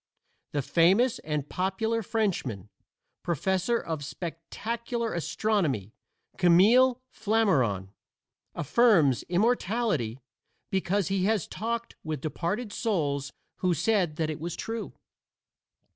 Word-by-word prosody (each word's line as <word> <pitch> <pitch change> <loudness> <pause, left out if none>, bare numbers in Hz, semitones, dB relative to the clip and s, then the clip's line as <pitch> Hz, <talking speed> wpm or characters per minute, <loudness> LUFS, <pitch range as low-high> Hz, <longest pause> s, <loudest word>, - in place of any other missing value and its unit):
The 145 -2 0
famous 195 - +3
and 150 -2 -3
popular 195 +6 -1
Frenchman, 175 - -2 0.5
Professor 190 - 0
of 160 -8 -4
Spectacular 225 - -4
Astronomy, 165 - -1 0.5
Camille 225 +9 +5
Flammarion, 145 - +1 0.7
affirms 165 - +4
immortality 195 - +1 0.5
because 190 0 0
he 195 -1 +1
has 215 -4 +1
talked 235 +2 -4
with 155 -3 -3
departed 175 - -3
souls 145 - -1 0.3
who 180 -2 +1
said 180 -3 +1
that 155 -1 -1
it 155 - -6
was 170 +2 -4
true. 225 +3 -5
185 Hz, 100 wpm, -28 LUFS, 155-225 Hz, 0.7 s, Camille